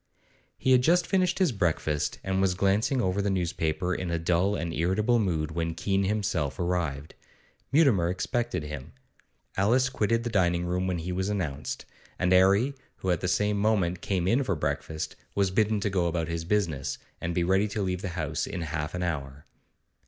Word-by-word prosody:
He 130 - +1
had 130 -1 +6
just 175 +6 +3
finished 185 -2 +1
his 185 -6 +3
breakfast, 80 -7 0
and 95 0 0
was 95 -1 +2
glancing 105 +7 +2
over 95 +2 +1
the 100 - 0
newspaper 90 -1 -1
in 90 0 -3
a 85 - 0
dull 90 +4 +1
and 85 -3 -3
irritable 105 +9 +2
mood, 80 -7 0
when 80 0 -2
Keene 95 +2 0
himself 95 -9 -1
arrived. 85 -5 -2 0.6
Mutimer 125 - +4
expected 95 - -1
him. 75 0 -7 0.6
Alice 120 +7 +3
quitted 115 -2 0
the 120 - -3
dining 90 -4 +2
room 90 +1 -1
when 90 -2 0
he 85 +2 -4
was 95 +2 -1
announced, 80 -8 -3 0.3
and 90 +1 +2
'Arry, 100 +9 +4 0.2
who 95 - -2
at 85 - 0
the 90 - -1
same 105 +3 +1
moment 95 -5 +1
came 90 -3 -1
in 120 +7 +3
for 100 -8 0
breakfast, 80 0 -3 0.2
was 100 -2 +2
bidden 105 +2 +2
go 95 -4 0
about 85 -1 -1
his 85 0 -3
business, 85 -9 0 0.2
and 85 0 -2
be 90 - +2
ready 95 +4 +3
to 105 0 -2
leave 90 -1 -2
the 95 - -3
house - - -2
in 95 -3 -4
half 75 0 -3
an 90 - -2
hour. 70 -4 -4
90 Hz, 185 wpm, -28 LUFS, 85-105 Hz, 0.6 s, had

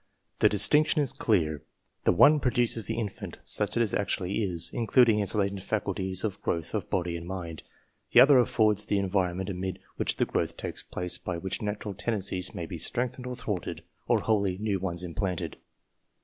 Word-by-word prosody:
The - - +5
distinction 145 +11 +5
is 140 -4 +1
clear: 80 - 0 0.4
the - - +5
one 150 - +6
produces 120 -4 +1
the 115 - -2
infant 110 -4 -5
such 105 +1 -2
as 115 -4 +1
it - - +1
actually 100 0 -1
is, 90 -5 -1
including 115 -2 +4
its 100 -1 0
latent 100 -1 0
faculties 95 -2 -2
of 105 -4 -3
growth 85 -1 -2
of - - -3
body 85 -2 -1
and 85 0 -7
mind; 85 -4 -6 0.5
the - - +6
other 135 +1 +8
affords 110 -4 +3
the 105 - 0
environ 95 -2 0
ment 95 +1 -3
amid 95 0 -4 0.2
which - - 0
the - - +1
growth - - -2
takes - - -5
place, 90 0 -4
by 90 -2 -4
which 95 +3 -4
natural 105 -1 -4
tendencies 95 -3 -2
may 85 - -4
be 85 0 -7
strengthened 125 - -2
or 125 - -4
thwarted, 105 -6 -4 0.2
or - - +3
wliolly 100 -4 0
new 105 -2 -1
ones 90 -1 -3
implanted. 90 +1 -3
100 Hz, 185 wpm, -28 LUFS, 90-110 Hz, 0.5 s, other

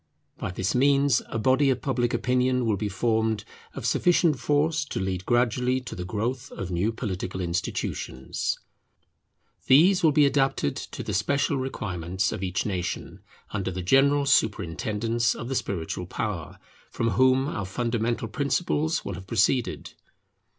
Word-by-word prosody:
By - - -3
this 90 +1 -2
means 140 0 +3
a - - -4
body 130 +5 +3
of 130 -1 0
public 120 -4 0
opinion 125 0 +1
will 110 -2 +2
be 105 +2 -2
formed 110 +1 0 0.3
of - - -6
sufficient 170 -5 +3
force 150 +1 +1
to 140 - -4
lead 95 -1 -3
gradually 125 +1 +2
to 125 - -8
the 90 - -5
growth 120 +7 -3
of 95 -2 -5
new 90 +6 +1
political 95 -5 -4
institutions. 85 -6 -3 1.1
These 180 +8 +6
will 160 -3 +5
be 150 0 +5
adapted 135 - +1
to - - -6
the - - -4
special 140 +8 +1
requirements 95 -8 -2
of - - -5
each 95 -1 -1
nation, 90 -4 -3 0.3
under 100 -3 -2
the 90 0 -4
general 140 +7 +4
superintendence 110 - +1
of 120 - -6
the - - -1
spiritual 90 -4 -3
power, 90 -3 -4 0.3
from 115 -1 -1
whom 130 +5 +3
our 105 -9 -3
fundamental 115 +2 -1
principles 150 - 0
will 100 - -3
have 95 +1 -9
proceeded. 115 +4 +1
115 Hz, 150 wpm, -26 LUFS, 95-135 Hz, 1.1 s, These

